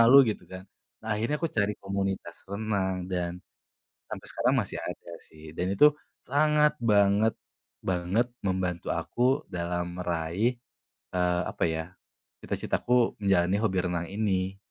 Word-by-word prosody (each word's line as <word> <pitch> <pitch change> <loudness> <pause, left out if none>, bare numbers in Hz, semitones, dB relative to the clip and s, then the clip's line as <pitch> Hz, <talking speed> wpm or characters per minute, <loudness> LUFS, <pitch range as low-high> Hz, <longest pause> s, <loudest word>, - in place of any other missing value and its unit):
malu, 115 +4 +8
gitu 105 - -6
kan. 95 0 -7 0.4
Nah, - - -6
akhirnya 115 +8 0
aku 165 - 0
cari 105 0 +2
komunitas 100 -1 -2
renang, 100 -2 -1
dan- 90 -1 -1 0.8
sampai - - -6
sekarang - - +2
masih - - -5
ada, - - -7 0.2
sih- 80 0 -12
dan 90 - 0
itu 150 - +7 0.4
sangat 150 +2 +4
banget-banget 100 -2 +1 0.2
membantu 90 -2 -1
aku - - -6 0.3
dalam 90 0 -3
meraih, 90 +7 0 0.6
eee, 90 0 +2
apa - - -1
ya, 80 0 -1 0.6
cita-citaku 125 -1 +1
menjalani 95 -1 +3
hobi 100 -4 +1
renang 85 -1 -1
ini. 95 -2 -1
95 Hz, 125 wpm, -28 LUFS, 90-110 Hz, 0.8 s, malu